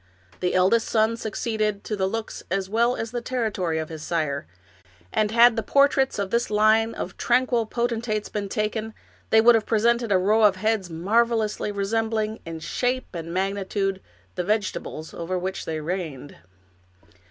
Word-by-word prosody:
The 180 - 0
eldest 190 +5 +3
son 220 0 +2
succeeded 215 -2 -2
to 215 - -3
the 190 -2 0
looks 225 +2 -4
as 190 +1 -1
well 235 +4 +2
as 225 0 -4
the 240 -1 -3
territory 215 -10 -1
of 160 -1 -3
his 160 -2 -7
sire, 155 - -2 0.7
and 215 -1 +2
had 235 +1 +6
the 225 - 0
portraits 275 +3 +3
of 200 -2 -2
this 235 +1 +1
line 215 +2 +3
of - - -6
tranquil 245 -2 +2
potentates 230 -2 -1
been 205 -2 -4
taken, 215 +2 -2 0.3
they 220 - +6
would 240 +2 +7
have 225 -2 +1
presented 235 +1 +2
a 190 - +5
row 210 +4 +3
of 205 -3 +5
heads 210 -1 0
marvelously 215 +5 +1
resembling, 220 +2 -1
in 165 -1 -6
shape 250 +8 -2
and 165 -1 -6
magnitude, 195 +1 -1 0.3
the 180 - -2
vegetables 190 -5 -2
over 170 +2 -3
which 190 +2 -4
they 160 -1 -3
reigned. 155 -4 -5
215 Hz, 165 wpm, -24 LUFS, 185-230 Hz, 0.7 s, would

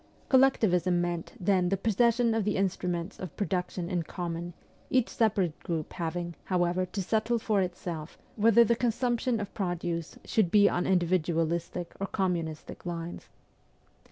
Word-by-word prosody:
Collectivism 195 -10 +4
me^ant 175 -1 -2
then 185 -1 +2
the 195 - +1
posses 230 +3 +3
sion 235 -2 +2
of 225 -1 +1
the 210 +1 0
instruments 180 -1 -2
of 185 -5 -7
production 180 -3 -2
in 175 -1 0
common, 170 0 -5 0.3
each 255 -3 +2
separate 195 -8 +1
group 160 -3 -4
having, 170 0 -3
however, 180 0 +1
to 195 +1 -3
settle 225 +4 +1
for 215 -3 +1
itself 175 -3 -5 0.2
whether 230 +1 +6
the 235 +1 +2
consumption 240 0 0
of 205 -1 -5
produce 175 -4 -3
should 215 -7 +2
be 205 +2 +6
on 175 - 0
indi 180 -2 +3
vidualistic 170 0 -1
or 195 - -2
communistic 170 -5 -3
lines. 170 -1 -6
180 Hz, 150 wpm, -29 LUFS, 175-215 Hz, 0.3 s, whether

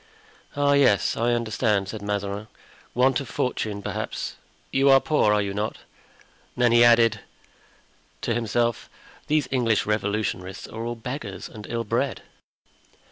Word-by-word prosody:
"Ah, 145 0 +3
yes, 140 -8 +3
I 120 +1 +1
understand," 110 -4 0
said 110 0 -6
Mazarin; 100 0 -3 0.5
"want 130 +1 +3
of 140 - -7
fortune, 105 -5 -2
perhaps. - - -4 0.4
You 135 +1 +3
are 135 0 +8
poor, 150 -8 +2
are 105 -1 +3
you 100 -1 -3
not?" 105 +2 -2 0.8
Then 120 -1 +4
he 120 0 +6
added 115 -2 +5 1.0
to 115 - 0
himself: 120 0 -1 0.4
"These 150 -3 +1
English 115 -5 +2
Revolutionists 100 -3 -2
are 115 +1 -6
all 120 0 -3
beggars 115 -4 -6
and 105 -1 -10
ill 115 0 -2
bred." 105 - -1
115 Hz, 135 wpm, -25 LUFS, 105-125 Hz, 1.0 s, are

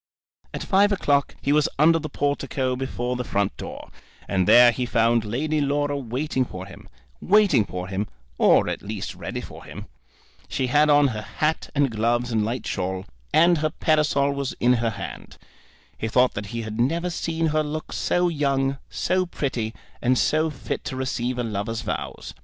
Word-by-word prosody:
At - - -5
five 205 +1 +3
o'clock 145 -8 +1
he 140 - +2
was 150 -1 +3
under 165 +3 +5
the 155 - -5
portico 140 -2 -1
before 125 -1 -3
the 125 - -2
front 100 -3 -1
door, - - -8 0.4
and 95 -2 +1
there 120 0 +8
he 125 +1 -3
found 115 0 +2
Lady 150 +8 -1
Laura 145 0 0
waiting 130 +1 -1
for 95 -6 -7
him, 95 - -13 0.3
waiting 190 - +4
for 90 -1 -5
him, 100 +2 -2 0.3
or - - +5
at - - -3
least 105 -1 -5
ready - - -5
for - - -11
him. - - -9 0.6
She 130 - -1
had 150 +1 +5
on 145 -1 +5
her 110 -3 -4
hat 155 +8 -2
and 140 -3 +2
gloves 120 +2 0
and 110 -2 +1
light 120 +4 -3
shawl, 95 0 -3 0.3
and 170 +2 +5
her 155 0 +1
parasol 150 -2 +2
was 140 -1 -3
in 125 +1 +4
her 115 - +1
hand. 105 - -8 0.6
He 110 - -2
thought 125 +3 +3
that 100 0 -5
he 115 +3 -4
had 110 +1 -6
never 170 +8 0
seen 165 -1 -1
her 155 - +3
look 155 +1 -5
so 180 0 +1
young, 140 -4 0
so 185 0 0
pretty, 125 -9 -2 0.3
and 125 +1 +2
so 155 +5 +2
fit 140 -4 -5
to - - -4
receive 130 -1 -2
a 125 - -1
lover's 110 0 -3
vows. 115 - -5
130 Hz, 180 wpm, -24 LUFS, 115-150 Hz, 0.6 s, there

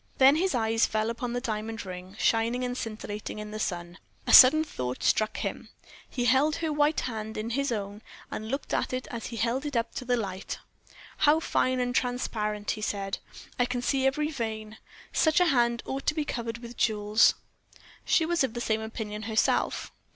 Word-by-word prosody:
Then 270 +3 +6
his 370 -1 +1
eyes 225 -1 +2
fell 215 +1 0
upon 235 +1 -4
the 245 - 0
diamond 225 -2 -4
ring, 185 +1 -8
shining 230 +3 +1
and 245 0 -2
scintillating 215 -3 -5
in 210 0 -6
the 215 - -5
sun. 175 -2 -4 0.3
A - - +1
sudden 295 +5 +10
thought 125 - -5
struck 215 0 +2
him: - - -4 0.4
he 245 -2 -2
held 270 +6 +4
her 320 -2 -2
white 295 +1 +2
hand 220 -2 -5
in 220 +2 -3
his 275 +2 0
own, 205 -1 -4 0.3
and 215 +1 -5
looked 275 +3 -3
at - - 0
it 255 0 -3
as 235 -2 -5
he 235 - -7
held 240 +4 0
it 290 -3 -4
up 230 - -1
to - - -5
the 245 0 +1
light. 195 -4 -4 0.6
"How 300 +2 +4
fine 255 -5 +1
and 245 0 0
transparent," 215 -5 -1
he 215 - -5
said. 195 -2 -2 0.4
"I 245 - +4
can 245 0 -3
see 270 +1 +2
every 300 +3 0
vein. 220 -4 -5 0.3
Such 315 0 +3
a 360 - +5
hand 235 -2 +2
ought 270 +1 -5
to 300 - +2
be 305 -2 -1
covered 230 -4 -4
with 235 0 -10
jewels." 210 0 +3 0.7
She 325 - +3
was 340 -2 +1
of 250 -4 -2
the - - -2
same 220 -2 0
opinion 220 -1 -5
herself. 220 0 +1
235 Hz, 195 wpm, -28 LUFS, 215-260 Hz, 0.7 s, sudden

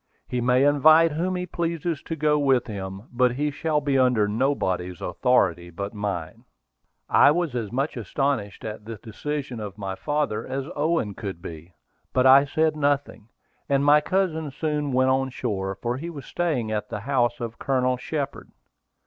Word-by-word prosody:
He 125 - -2
may 125 +2 +3
invite 155 +3 +6
whom 175 +5 -1
he 180 0 -2
pleases 170 -2 -2
to 165 - -5
go 150 -1 +2
with 135 -3 +3
him. 95 -2 -6
But 125 0 +3
he 145 +3 -1
shall 155 +1 0
be 140 -2 +1
under 125 -5 +3
nobody's 100 - -1
authority 90 -5 +1
but 100 +5 -5
mine." 100 -6 -4 0.6
I - - +6
was 165 -2 0
as 115 -5 -3
much 135 +5 -1
astonished 115 -3 -2
at 105 -1 -6
the 115 0 -6
decision 130 +3 -5
of 105 -2 -7
my 100 -2 -4
father 145 -2 -1
as 135 +2 -4
Owen 150 -8 0
could 95 -4 -6
be; 85 +1 -10 0.4
but 130 0 +3
I 135 +2 +8
said 155 +2 +1
nothing, 145 -6 -1 0.4
and 140 0 +2
my 150 +1 +6
cousin 165 -5 0
soon 150 0 -2
went 130 +1 +3
on 135 0 +1
shore, 95 -7 -3
for 120 +1 -2
he 165 +5 -5
was 145 -6 -8
staying 145 -11 -1
at 105 -1 -2
the 105 - -5
house 120 -1 +1
of 115 -1 -6
Colonel 130 -1 +1
Shepard. 140 +3 -4
130 Hz, 175 wpm, -25 LUFS, 105-150 Hz, 0.6 s, I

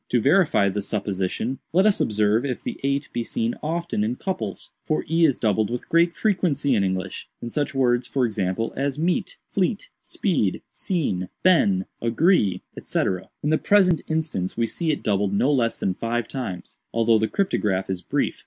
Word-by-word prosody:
To 125 - +3
verify 145 - +4
the 100 +1 -1
supposition, 100 +4 -2
let 190 +4 +4
us 210 -2 +3
observe 105 +2 +2
if 130 -3 -3
the - - -5
8 140 +1 0
be 120 - -1
seen 115 +1 -1
often 170 -7 -1
in 115 +3 -1
couples—for 155 - -4
e 165 +1 +3
is 140 -5 +2
doubled 110 -1 +1
with 120 0 -4
great 170 +1 +3
frequency 170 - +1
in 105 -4 +2
English—in 95 +5 -4
such 145 +1 -2
words, 120 -2 +2
for 130 -2 +1
example, 100 0 -2
as 140 +1 -1
'meet,' 175 - -1 0.2
'.fleet,' - - 0
'speed,' - - -1
'seen,' 115 - -2
been,' 100 - +4 0.2
'agree,' 115 - +2 0.2
&c. - - -1 0.4
In 150 - +1
the 155 - +3
present 185 -5 +4
instance 155 - -2
we 115 - +2
see 160 +8 -2
it 150 - -1
doubled 100 -1 +1
no 135 +8 +3
less 115 -4 +1
than 95 - -1
five 115 +3 -2
times, 95 -10 -6
although 115 -1 +3
the 110 - +1
cryptograph 105 - 0
is 95 -2 -3
brief. - - -1
120 Hz, 170 wpm, -24 LUFS, 105-160 Hz, 0.4 s, verify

